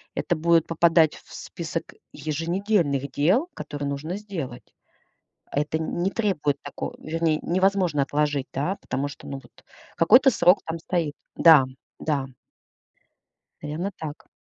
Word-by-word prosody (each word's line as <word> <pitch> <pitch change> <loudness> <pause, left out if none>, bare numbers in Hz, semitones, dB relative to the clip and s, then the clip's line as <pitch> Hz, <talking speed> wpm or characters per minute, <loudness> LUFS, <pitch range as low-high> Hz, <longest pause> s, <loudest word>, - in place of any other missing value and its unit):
это 175 - 0
будет 165 0 +3
попадать 165 -1 +4
в - - -15
список - - -6 0.2
еженедельных 160 -1 -1
дел, 195 - +2
которые 145 -1 -5
нужно 150 +5 -4
сделать. 165 - -7 0.8
Это 150 +2 -1
не 175 +4 -1
требует 160 -11 0
тако 145 - -6
вернее, 160 -1 0
невозможно 185 -4 +2
отложить, 145 -1 0
да, 150 +8 -1
потому 135 +3 -2
что, 145 - -11
ну, 140 - -5
вот - - -21 0.3
какой-то 250 - +6
срок 180 -1 +4
там 165 0 -3
стоит. 165 -3 -1 0.2
Да, 160 -5 +8 0.4
да. 140 -4 -1 1.3
Наверно, 155 +7 -3
так. 155 -1 -7
160 Hz, 125 wpm, -25 LUFS, 145-180 Hz, 1.3 s, Да